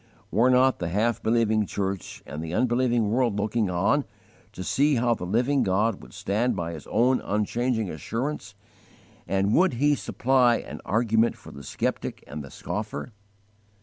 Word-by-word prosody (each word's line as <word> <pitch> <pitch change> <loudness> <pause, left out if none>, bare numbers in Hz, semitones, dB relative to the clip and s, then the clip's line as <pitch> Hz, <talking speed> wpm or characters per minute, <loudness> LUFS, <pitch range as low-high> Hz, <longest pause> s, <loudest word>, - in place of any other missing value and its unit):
Were 115 +7 +4
not 130 +1 +4
the 90 - -2
half 110 +6 0
believing 110 -2 +2
church 95 -2 -4
and 75 +2 -6
the 80 +2 -4
unbelieving 120 -3 +2
world 120 -3 +1
looking 105 0 0
on, 95 +11 +2 0.5
to 95 -3 -7
see 145 - +2
how 120 0 +2
the 90 -5 -5
Living 125 +8 +2
God 100 +3 +1
would 60 - -14
stand 110 - -1
by 85 -2 -3
His 80 - -9
own 125 +4 +2
unchanging 110 +2 -1
assurance, 110 - -4 0.7
and 100 +2 +1
would 185 -3 +4
He 145 +5 +3
supply 130 -3 +2
an - - -7
argument 115 +1 +2
for - - -13
the 70 - -10
skeptic 70 - -3
and 75 +3 -7
the 70 - -10
scoffer? 105 - -5
110 Hz, 160 wpm, -26 LUFS, 95-125 Hz, 0.7 s, Were